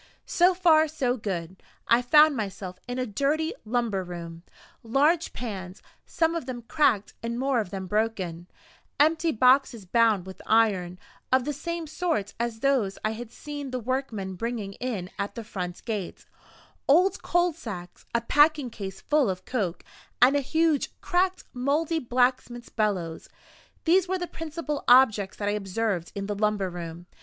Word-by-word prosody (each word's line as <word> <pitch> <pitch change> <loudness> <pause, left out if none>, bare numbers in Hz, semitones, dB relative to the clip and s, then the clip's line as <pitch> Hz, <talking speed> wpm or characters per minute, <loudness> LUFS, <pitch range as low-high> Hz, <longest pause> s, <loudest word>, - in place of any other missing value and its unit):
So 360 +1 +3
far, 320 -3 +5
so 270 -5 -1
good 185 -5 -5 0.3
I 235 +1 +5
found 300 +4 +6
myself 190 -4 -5
in 245 0 -4
a 255 - 0
dirty 285 +8 0
lumber 220 -4 0
room. 170 -2 -8 0.4
Large 295 +8 +2
pans, 190 -5 -6 0.2
some 325 0 +1
of 335 -6 -4
them 245 -2 -5
cracked 235 -6 +1
and 235 0 -3
more 265 -1 +1
of 210 - -3
them 190 -1 -5
broken; 190 -5 -2 0.5
empty 320 +2 +3
boxes 250 -3 +3
bound 220 -2 +3
with 190 0 -10
iron, 195 -6 +2 0.3
of 260 -1 +3
the 295 - -1
same 335 +3 -4
sort 315 - -2
as 235 -1 -2
those 255 -8 +1
I 215 - +1
had 230 +1 -7
seen 290 -1 -7
the 255 0 -3
workmen 230 -6 -3
bringing 215 0 -4
in 205 -6 -4
at 200 0 -3
the 230 - -5
front 180 -4 -6
gate; 210 -6 -4 0.6
old 360 +7 +4
coal 350 0 +2
sacks; 190 - -9
a 235 - +3
packing 295 +1 +3
case 195 -3 -7
full 295 -7 +2
of 185 0 -4
coke; 190 -9 -2 0.4
and 255 +3 +6
a 285 - +3
huge, 315 +1 0
cracked, 365 +1 +1
mouldy 295 +6 0
blacksmith's 245 -1 0
bellows 185 -7 -2 0.6
these 360 +2 +4
were 375 +1 0
the 355 - -3
principal 315 -3 -5
objects 220 -6 +5
that 205 - -3
I - - +2
observed 200 -3 -2
in 200 0 -3
the 205 - -2
lumber 205 -2 0
room. 170 0 -7
235 Hz, 160 wpm, -26 LUFS, 195-295 Hz, 0.6 s, found